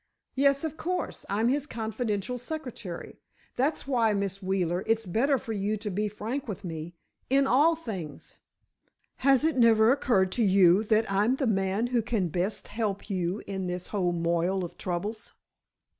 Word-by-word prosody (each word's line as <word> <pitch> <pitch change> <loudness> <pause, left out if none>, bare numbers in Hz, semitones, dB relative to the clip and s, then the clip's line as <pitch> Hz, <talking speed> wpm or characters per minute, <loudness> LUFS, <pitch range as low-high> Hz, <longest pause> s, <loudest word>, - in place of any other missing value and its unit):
"Yes, 275 +1 +3
of 315 -1 -4
course, 360 +2 -3
I'm 215 +3 +1
his 285 +2 0
confidential 225 0 -3
secretary. 245 - -7 0.4
That's 280 +5 0
why, 235 -5 +2
Miss 200 0 -2
Wheeler, 185 -1 0
it's 225 0 +1
better 255 +10 +2
for 225 -2 -5
you 210 +1 -1
to 210 0 -5
be 210 +3 -1
frank 225 +7 -4
with 205 -2 -5
me—in 170 - -3
all 295 +6 +4
things. 190 - -7 0.8
Has 270 0 +4
it 320 -3 +1
never 225 -1 +6
occurred 200 -9 +2
to 240 - +1
you 190 -1 +5
that 220 +1 +3
I'm 205 +6 +2
the 270 - -1
man 195 0 +1
who 240 - +3
can 220 -6 -1
best 185 +6 -2
help 210 -2 -3
you 185 +1 -2
in 190 -2 -4
this 180 0 -4
whole 185 -4 0
moil 170 +2 0
of 175 - -7
troubles?" 200 +5 -4
215 Hz, 160 wpm, -28 LUFS, 190-245 Hz, 0.8 s, never